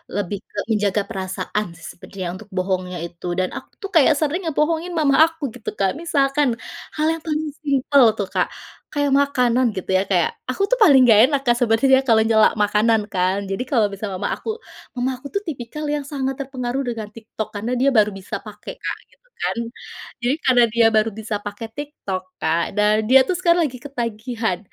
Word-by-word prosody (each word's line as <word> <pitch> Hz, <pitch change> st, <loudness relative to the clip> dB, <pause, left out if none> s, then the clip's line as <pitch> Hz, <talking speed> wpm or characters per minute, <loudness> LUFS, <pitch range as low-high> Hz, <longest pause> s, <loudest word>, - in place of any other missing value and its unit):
lebih 205 Hz, 0 st, -2 dB
ke -, -, -18 dB
menjaga 210 Hz, -1 st, +1 dB
perasaan 190 Hz, +2 st, -3 dB
sih 165 Hz, -, -13 dB
sepertinya 180 Hz, -1 st, -7 dB
untuk 205 Hz, +2 st, -12 dB
bohongnya 185 Hz, -1 st, -1 dB
itu. 170 Hz, +1 st, -10 dB
Dan 185 Hz, -, 0 dB
aku -, -, -8 dB
tuh 395 Hz, -, -5 dB
kayak 315 Hz, -1 st, +6 dB
sering 310 Hz, +4 st, 0 dB
ngebohongin 320 Hz, +3 st, 0 dB
mama 285 Hz, -3 st, +3 dB
aku 325 Hz, -1 st, -8 dB
gitu 245 Hz, -, -5 dB
Kak 195 Hz, +2 st, +1 dB
misalkan, 290 Hz, -3 st, +1 dB, 0.5 s
hal 305 Hz, 0 st, +2 dB
yang 325 Hz, -, -6 dB
paling 310 Hz, -1 st, -2 dB, 0.2 s
simple 280 Hz, -1 st, +4 dB
tuh 200 Hz, -, -1 dB
Kak, -, -, +2 dB, 0.4 s
kayak 290 Hz, -1 st, 0 dB
makanan 255 Hz, -3 st, +2 dB
gitu 190 Hz, -, -6 dB
ya 190 Hz, -, +3 dB
kayak, 175 Hz, -3 st, +3 dB, 0.2 s
aku 255 Hz, -, -2 dB
tuh -, -, +3 dB
paling 285 Hz, -9 st, +7 dB
nggak 215 Hz, -3 st, +7 dB
enak 285 Hz, -, +2 dB
Kak 240 Hz, -, +5 dB
sebenernya 245 Hz, +3 st, +4 dB
kalau 230 Hz, -4 st, +4 dB
nyela 220 Hz, -1 st, +5 dB
makanan 210 Hz, +2 st, +3 dB
kan. 190 Hz, +2 st, 0 dB
Jadi 195 Hz, +6 st, -2 dB
kalau 225 Hz, -6 st, +3 dB
misalnya 200 Hz, -1 st, -5 dB
mama -, -, -2 dB
aku 445 Hz, 0 st, -5 dB, 0.4 s
mama 250 Hz, +1 st, +1 dB
aku 255 Hz, +3 st, -17 dB
itu 400 Hz, -, 0 dB
tipikal 300 Hz, +1 st, -5 dB
yang 295 Hz, 0 st, -1 dB
sangat 270 Hz, -1 st, -3 dB
terpengaruh 265 Hz, -1 st, -3 dB
dengan 230 Hz, -4 st, -4 dB
TikTok 220 Hz, -1 st, -6 dB
karena 215 Hz, +4 st, -3 dB
dia 270 Hz, +2 st, +4 dB
baru 210 Hz, -1 st, +4 dB
bisa 190 Hz, -, -6 dB
pakai -, -, -9 dB
Kak -, -, -4 dB
gitu -, -, -30 dB
kan. -, -, -1 dB, 0.7 s
Jadi 245 Hz, +4 st, +1 dB
karena 250 Hz, -2 st, +5 dB
dia 235 Hz, -1 st, +4 dB
baru 215 Hz, +1 st, +3 dB
bisa 220 Hz, 0 st, -3 dB
pakai 205 Hz, +2 st, -6 dB
TikTok 285 Hz, -11 st, -5 dB, 0.2 s
Kak 165 Hz, +2 st, 0 dB
dan 210 Hz, 0 st, +4 dB
dia 265 Hz, +1 st, +8 dB
tuh 370 Hz, -, 0 dB
sekarang 345 Hz, -1 st, +3 dB
lagi 255 Hz, -4 st, -6 dB
ketagihan, 230 Hz, -6 st, -3 dB
240 Hz, 190 wpm, -21 LUFS, 205-285 Hz, 0.7 s, dia